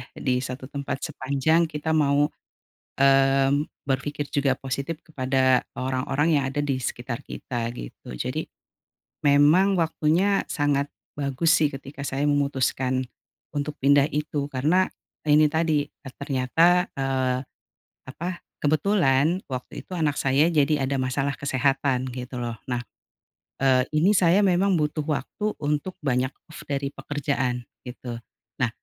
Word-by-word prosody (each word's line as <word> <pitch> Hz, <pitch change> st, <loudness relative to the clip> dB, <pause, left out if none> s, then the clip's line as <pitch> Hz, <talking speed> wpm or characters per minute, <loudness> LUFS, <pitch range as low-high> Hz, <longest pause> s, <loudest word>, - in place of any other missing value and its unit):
di 125 Hz, -2 st, 0 dB
satu 130 Hz, +1 st, -6 dB
tempat 140 Hz, -1 st, -4 dB
sepanjang 150 Hz, +5 st, +1 dB
kita 155 Hz, 0 st, -3 dB
mau, 145 Hz, -1 st, +3 dB, 0.7 s
mmm, 135 Hz, +1 st, +4 dB, 0.2 s
berpikir 145 Hz, +2 st, -2 dB
juga 140 Hz, -2 st, +2 dB
positif 140 Hz, +4 st, -4 dB
kepada 130 Hz, -3 st, +1 dB
orang-orang 135 Hz, +4 st, 0 dB
yang 140 Hz, -, +1 dB
ada 145 Hz, -, 0 dB
di 140 Hz, -2 st, 0 dB
sekitar 120 Hz, -1 st, -4 dB
kita 120 Hz, -2 st, -4 dB
gitu. 60 Hz, -, -9 dB
Jadi -, -, -3 dB, 0.8 s
memang 150 Hz, +7 st, +5 dB
waktunya 170 Hz, +4 st, +2 dB
sangat 145 Hz, -1 st, +1 dB, 0.2 s
bagus 145 Hz, +3 st, +1 dB
sih 155 Hz, -4 st, +4 dB
ketika 135 Hz, 0 st, -9 dB
saya 140 Hz, +1 st, -1 dB
memutuskan 130 Hz, -2 st, +1 dB, 0.5 s
untuk 145 Hz, 0 st, -3 dB
pindah 140 Hz, +1 st, +4 dB
itu, 150 Hz, -1 st, -2 dB
karena 155 Hz, +8 st, +2 dB, 0.4 s
ini 150 Hz, +1 st, +6 dB
tadi, 160 Hz, -3 st, +2 dB
eee, 130 Hz, -3 st, -14 dB
ternyata, 155 Hz, +7 st, +2 dB
eee, 130 Hz, -1 st, 0 dB, 0.6 s
apa, 175 Hz, +6 st, -5 dB, 0.2 s
kebetulan 155 Hz, 0 st, +2 dB
waktu 130 Hz, -2 st, -6 dB
itu 185 Hz, -, -9 dB
anak 150 Hz, -4 st, 0 dB
saya 140 Hz, +5 st, +3 dB
jadi 150 Hz, -2 st, +2 dB
ada 135 Hz, 0 st, 0 dB
masalah 135 Hz, +2 st, 0 dB
kesehatan 135 Hz, -1 st, 0 dB
gitu 125 Hz, 0 st, -5 dB
loh. 115 Hz, -2 st, -4 dB
Nah, 125 Hz, -1 st, -2 dB, 0.7 s
eee, 130 Hz, -1 st, +3 dB
ini 180 Hz, +7 st, +4 dB
saya 185 Hz, +1 st, +4 dB
memang 190 Hz, 0 st, +3 dB
butuh 150 Hz, 0 st, 0 dB
waktu 210 Hz, +7 st, -2 dB
untuk 150 Hz, +5 st, -2 dB
banyak 130 Hz, -2 st, +1 dB, 0.2 s
off -, -, -9 dB
dari 140 Hz, 0 st, -2 dB
pekerjaan 130 Hz, -4 st, -2 dB, 0.2 s
gitu. 125 Hz, -2 st, -7 dB, 0.4 s
Nah 120 Hz, -, +3 dB
140 Hz, 130 wpm, -25 LUFS, 130-155 Hz, 0.8 s, ini